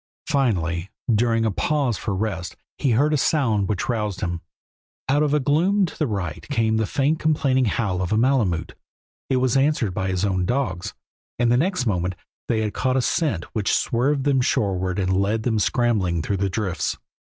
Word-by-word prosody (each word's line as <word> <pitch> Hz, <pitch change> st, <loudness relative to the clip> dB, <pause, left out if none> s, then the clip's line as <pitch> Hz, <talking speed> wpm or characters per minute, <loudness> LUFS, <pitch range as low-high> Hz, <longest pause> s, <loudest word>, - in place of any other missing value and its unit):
Finally, 95 Hz, -, 0 dB, 0.2 s
during 115 Hz, +1 st, +2 dB
a 110 Hz, -, +1 dB
pause 140 Hz, +2 st, 0 dB
for 100 Hz, 0 st, -3 dB
rest 95 Hz, -3 st, -3 dB, 0.2 s
he 140 Hz, -, +1 dB
heard 145 Hz, +7 st, +3 dB
a -, -, +3 dB
sound 115 Hz, -9 st, +1 dB
which 100 Hz, -3 st, -1 dB
roused 105 Hz, -5 st, -2 dB
him. 85 Hz, -3 st, -2 dB, 0.7 s
Out 140 Hz, +2 st, +2 dB
of 150 Hz, -, +2 dB
the 150 Hz, +1 st, +2 dB
gloom 170 Hz, +9 st, +2 dB
to 170 Hz, -, -8 dB
the 155 Hz, -, 0 dB
right 95 Hz, -8 st, -3 dB
came 115 Hz, -5 st, +1 dB
the 110 Hz, -1 st, 0 dB
faint 145 Hz, +3 st, +1 dB
complaining 140 Hz, -4 st, +2 dB
howl 100 Hz, -4 st, -1 dB
of 90 Hz, -, -2 dB
a 110 Hz, -, +2 dB
malemute; 110 Hz, -, +1 dB, 0.6 s
it 130 Hz, -, +2 dB
was 130 Hz, -1 st, +1 dB
answered 135 Hz, -7 st, +2 dB
by 95 Hz, 0 st, -2 dB
his 95 Hz, +1 st, 0 dB
own 95 Hz, -2 st, 0 dB
dogs, 95 Hz, -5 st, -2 dB, 0.4 s
and 120 Hz, -1 st, +2 dB
the -, -, +4 dB
next 170 Hz, +1 st, +1 dB
moment 90 Hz, -4 st, -1 dB, 0.3 s
they 110 Hz, -2 st, +1 dB
had 105 Hz, -1 st, -2 dB
caught 130 Hz, 0 st, 0 dB
a -, -, +3 dB
scent 135 Hz, -, 0 dB
which 105 Hz, -3 st, +1 dB
swerved 135 Hz, +4 st, +1 dB
them 135 Hz, -2 st, +2 dB
shoreward 95 Hz, -5 st, 0 dB
and 95 Hz, -1 st, +1 dB
led 110 Hz, +3 st, 0 dB
them 110 Hz, -3 st, +1 dB
scrambling 100 Hz, -8 st, +1 dB
through 100 Hz, +5 st, -1 dB
the 100 Hz, +1 st, 0 dB
drifts. 95 Hz, -5 st, -2 dB
110 Hz, 190 wpm, -23 LUFS, 95-135 Hz, 0.7 s, the